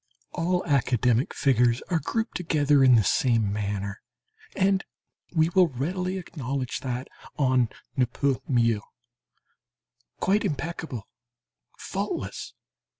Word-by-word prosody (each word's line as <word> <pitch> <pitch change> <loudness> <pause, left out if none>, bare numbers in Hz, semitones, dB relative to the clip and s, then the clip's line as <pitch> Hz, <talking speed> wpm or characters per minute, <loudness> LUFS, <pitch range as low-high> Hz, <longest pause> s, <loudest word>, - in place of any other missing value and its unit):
All 180 +1 0
academic 125 -4 +2
figures 125 -3 +2
are 170 - +3
grouped 225 +7 -2
together 150 -5 +3
in 130 -2 +7
the 110 - +5
same 115 -1 +2
manner, 100 -1 -3 0.5
and 195 0 +2 0.5
we 160 0 +4
will 180 0 +5
readily 180 +7 -2
acknowledge 135 -7 -4
that 125 0 -4 0.3
on 130 -4 +3 0.3
ne 130 -3 +2
peut 130 -1 0
mieux. 115 -4 +2 1.4
Quite 200 +4 +2
impeccable 160 - -4 0.7
faultless! - - -4
135 Hz, 105 wpm, -26 LUFS, 120-170 Hz, 1.4 s, in